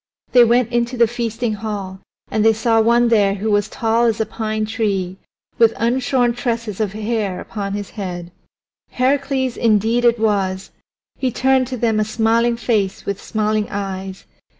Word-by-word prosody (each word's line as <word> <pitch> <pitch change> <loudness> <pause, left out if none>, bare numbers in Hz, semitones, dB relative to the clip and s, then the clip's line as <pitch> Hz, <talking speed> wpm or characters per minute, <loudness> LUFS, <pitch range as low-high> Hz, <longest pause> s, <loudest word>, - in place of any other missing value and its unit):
They 245 -1 +7
went 235 0 +2
into 240 +1 -1
the 235 - +5
feasting 230 0 -2
hall 200 -3 -5 0.3
and 215 - +1
they 225 0 +5
saw 225 0 +2
one 235 +1 +3
there 205 -3 +3
who 210 +2 -2
was 205 0 +1
tall 230 0 +1
as 225 -2 +1
a 220 - +1
pine 215 0 -3
tree, 200 -5 -2 0.4
with 225 -1 +5
unshorn 245 0 +1
tresses 230 -4 -3
of 205 -2 -1
hair 215 -3 -2
upon 200 -2 -5
his 205 -1 -5
head. 175 -4 -6 0.6
Heracles 265 -1 0
indeed 225 +2 +2
it 240 -1 +4
was! 195 -3 -1 0.5
He 260 - +1
turned 260 +1 +2
to 255 0 -5
them 225 -2 +1
a - - +3
smiling 230 +2 +1
face 215 -5 -1
with 200 -1 -3
smiling 215 -1 -1
eyes. 195 -1 -5
220 Hz, 165 wpm, -19 LUFS, 205-235 Hz, 0.6 s, They